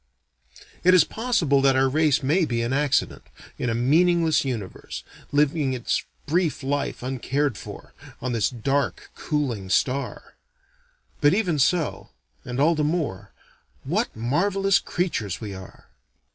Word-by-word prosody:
It 185 +1 +6
is 175 - +7
possible 195 - +1
that 135 -1 +4
our 135 0 +4
race 150 0 +2
may 160 +7 +2
be 120 -6 -1
an 120 +3 -1
accident, 140 0 +1 0.4
in 125 - -1
a 115 - 0
meaningless 165 +6 +3
universe, 120 -8 -5 0.3
living 145 -1 +2
its 125 -2 -1 0.2
brief 160 -2 0
life 140 -2 -2
uncared 135 +1 -1
for, - - -10 0.3
on 125 - -3
this 115 -3 +1
dark, 130 -3 -2
cooling 125 -11 -2
star: 135 +8 -1 0.9
but 145 +4 +4
even 180 -8 0
so 160 +4 +1 0.3
and 125 +2 -5
all 155 +4 +4
the 155 -2 0
more 150 - -2 0.5
what - - -1
marvelous 190 - +2
creatures 115 - -2
we 105 -3 -6
are! 95 -1 -12
140 Hz, 135 wpm, -24 LUFS, 125-165 Hz, 0.9 s, is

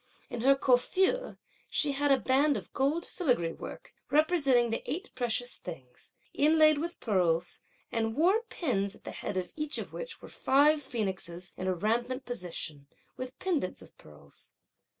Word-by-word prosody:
In 240 - -4
her 275 +3 +6
coiffure, 375 - +2 0.3
she 295 - +1
had 285 +1 +1
a 270 - +6
band 275 +3 +3
of - - -9
gold 290 +6 +1
filigree 245 - 0
work, - - -9 0.2
representing 280 -7 +3
the 225 - -1
eight 375 +7 -4
precious 245 0 -1
things, 130 -8 -10 0.2
inlaid 310 0 +5
with 340 +3 -4
pearls; 175 -5 +1 0.3
and 225 -1 -1
wore 370 - +4
pins, 200 - -1
at - - -21
the - - -6
head 190 - -4
of 180 -1 -3
each 305 -1 -1
of - - -6
which - - -6
were - - -11
five 295 +3 +3
phoenixes 190 -8 -4
in 185 - -4
a 185 - +1
rampant 240 +7 -1
position, 165 -10 -5 0.3
with 255 +1 -7
pendants 320 - -1
of - - -17
pearls. 75 -2 -13
255 Hz, 160 wpm, -30 LUFS, 190-305 Hz, 0.3 s, her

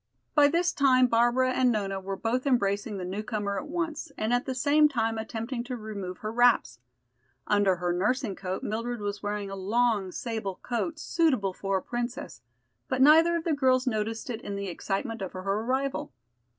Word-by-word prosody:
By 295 -1 +6
this 340 +4 +1
time 255 -2 +4
Barbara 240 +2 +3
and 255 -1 +3
Nona 195 -3 -1
were 195 +1 -4
both 245 +6 -1
embracing 205 -4 +1
the 185 - -4
newcomer 200 +1 -3
at - - -8
once, 330 -1 -3
and 220 +2 0
at 245 +1 +1
the 260 - -2
same 300 +3 +4
time 225 -4 -1
attempting 230 +2 -4
to 250 0 -4
remove 200 -5 -6
her 215 - -5
wraps. 235 - +3 0.7
Under 205 -2 +3
her 175 0 -1
nursing 210 +3 0
coat 185 0 -4
Mildred 230 +2 -3
was 205 0 -4
wearing 205 -1 -3
a - - -4
long 205 0 +1
sable 220 -3 -4
coat, 255 +7 -2
suitable 265 - +1
for 195 +1 -1
a - - -3
princess, 240 - -5 0.5
but 260 - -1
neither 320 +5 +6
of 335 - -1
the 330 - 0
girls 260 -2 +2
noticed 225 0 -2
it 230 -1 -5
in 205 - -5
the 200 -1 -4
excitement 205 +6 -3
of 190 - -5
her 185 - -6
arrival. 250 +8 -1
225 Hz, 185 wpm, -28 LUFS, 200-255 Hz, 0.7 s, By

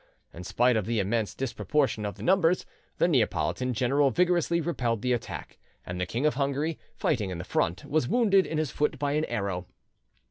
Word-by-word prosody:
In 85 - -8
spite 120 +6 +2
of 110 -4 -1
the 115 -1 0
immense 105 +1 -1
disproportion 135 -3 -1
of 100 - -5
the - - -10
numbers, 180 -2 +3 0.3
the - - +3
Neapolitan 110 - +1
general 135 +4 +3
vigorously 175 +3 +2
repelled 120 -10 -1
the 125 0 +2
attack; 120 -2 -5 0.3
and 90 0 -4
the 90 - -1
King 120 +9 -2
of 150 - +3
Hungary, 140 +4 -1 0.2
fighting 110 -10 0
in 90 - -4
the 85 - -5
front, 90 0 -1
was 150 -4 0
wounded 205 -4 +3
in 160 - -3
his 155 -4 -1
foot 150 +2 0
by 140 +1 -1
an 155 +2 +1
arrow. 95 -3 -3
125 Hz, 190 wpm, -28 LUFS, 105-155 Hz, 0.3 s, numbers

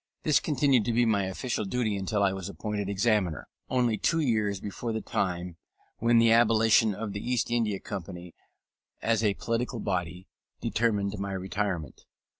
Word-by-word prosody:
This 150 - +4
continued 140 -5 +2
to 120 - 0
be 120 +1 +3
my 105 -4 +2
official 105 +5 -3
duty 110 +1 -1
until 100 +1 -1
I 95 -1 +2
was 95 0 -5
appointed 105 -1 -4
Examiner, 100 - 0 0.2
only 120 -4 +1
two 165 - +1
years 110 - +1
before 105 +4 -5
the 110 - -1
time 90 -4 -2 0.4
when 115 +1 +4
the 115 0 +5
abolition 115 -2 +4
of 105 -1 -5
the 100 - -4
East 120 +1 -1
India 110 -5 0
Company 90 -3 -7 0.7
as 115 -1 +2
a 105 -2 +2
political 120 +1 -2
body 90 -2 -3 0.3
determined 105 -3 0
my 100 0 -3
retirement. 95 -5 -3
105 Hz, 160 wpm, -28 LUFS, 95-115 Hz, 0.7 s, the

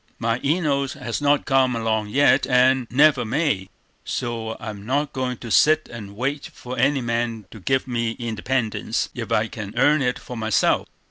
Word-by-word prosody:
"My 115 +1 -1
Enos 140 -3 0
has 115 +4 -4
not 145 0 +2
come 130 -2 +2
along 110 -2 -1
yet, 140 +3 +3
and 125 0 +3
never 140 0 +4
may; 120 - -1 0.3
so 115 -2 -4
I'm 105 -3 -7
not 140 +5 -1
going 130 -2 -2
to 115 -1 -8
sit 155 +5 +4
and 105 -4 -9
wait 135 +5 -3
for 125 +1 -8
any 135 +2 +2
man 115 -2 -2
to 110 - -10
give 130 +7 0
me 115 -2 -1
independence, 115 0 -2
if - - -6
I 110 +1 +2
can 105 -1 -8
earn 145 +3 +4
it 125 -1 0
for 125 - -9
myself." 110 -2 +1
125 Hz, 175 wpm, -23 LUFS, 115-135 Hz, 0.3 s, never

